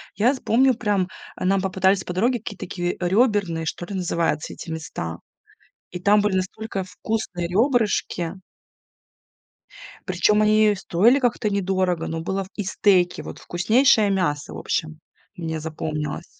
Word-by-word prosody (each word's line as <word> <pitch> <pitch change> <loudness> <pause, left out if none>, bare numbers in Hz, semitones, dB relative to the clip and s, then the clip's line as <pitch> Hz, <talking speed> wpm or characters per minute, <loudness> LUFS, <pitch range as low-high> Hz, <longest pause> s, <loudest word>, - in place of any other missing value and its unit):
Я 240 +6 +3
з 265 - -7
помню, 260 +4 +4
прям 205 -5 0 0.3
нам 190 +1 +1
попадались 190 0 +2
по 180 - -5
дороге 235 +6 +1
какие-то 205 -2 -7
такие 175 0 -3
рёберные, 190 -4 +1
что 175 - -4
ли 195 - -6
называются 170 -4 -1
эти - - -9
места, 115 - -5 0.7
и 180 - -5
там 205 +3 +4
были 205 -2 +1
настолько 195 +1 -3
вкусные 180 -1 -3
рёбрышки. 210 - +1 1.7
Причём 210 +3 +2
они 215 0 +4
стоили 200 +8 +3
как-то 240 -4 0
недорого, 185 -3 0
но 165 0 -3
было 190 +4 -2
в - - -15
и 210 - -3
стейки, 190 -2 +2
вот - - -9
вкуснейшее 215 +5 +3
мясо, 175 -7 -1
в - - -7
общем, 155 0 -3 0.3
мне 165 -4 -4
запомнилось. 155 -1 -4
190 Hz, 145 wpm, -23 LUFS, 175-210 Hz, 1.7 s, помню